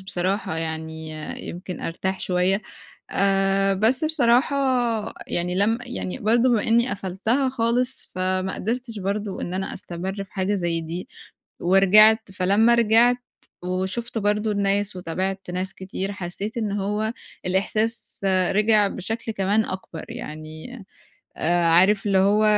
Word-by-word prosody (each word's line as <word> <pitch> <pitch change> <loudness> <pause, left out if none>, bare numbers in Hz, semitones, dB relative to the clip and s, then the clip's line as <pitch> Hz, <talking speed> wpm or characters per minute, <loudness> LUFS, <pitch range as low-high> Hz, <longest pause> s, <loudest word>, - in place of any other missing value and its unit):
بصراحة 190 -2 -2
يعني 160 -1 -5 0.4
يمكن 180 +1 -6
أرتاح 190 +3 -3
شوية. 185 +3 +1 0.5
آآ 195 0 +2
بس 230 +9 +2
بصراحة 280 -2 +3 0.7
يعني 175 +1 -2
لم 215 +5 +2
يعني 245 -3 -5
برضه 235 +3 +3
بما 230 -4 +3
إنّي 235 +2 +2
قفلتها 205 +8 -1
خالص، 245 +1 -1
فما 185 +1 -1
قدرتش 230 +1 -3
برضه 200 +1 -3
إن 180 - -4
أنا 190 0 -3
أستمر 190 +3 -5
في 190 - -25
حاجة 195 +1 0
زي 170 -3 -1
دي 165 +3 -6 0.5
ورجعت، 200 +4 +5
فلمّا 200 +6 +3
رجعت 235 +2 +5 0.5
وشُفت 190 +6 -3
برضه 210 +1 +1
الناس 200 -1 0
وتابعت 185 +2 -3
ناس 185 +1 -3
كتير، 190 +1 -5
حسّيت 195 +4 -5
إن 215 -3 -1
هو 210 +2 -1 0.3
الإحساس 215 +5 -1 0.3
رِجِع 210 0 +4
بشكل 225 +5 -4
كمان 205 +2 +1
أكبر. 185 -3 -6
يعني 155 +9 -8 0.5
عارف 175 +5 +3
اللي 195 -1 +3
هو 205 +3 +4
195 Hz, 125 wpm, -23 LUFS, 185-220 Hz, 0.7 s, ورجعت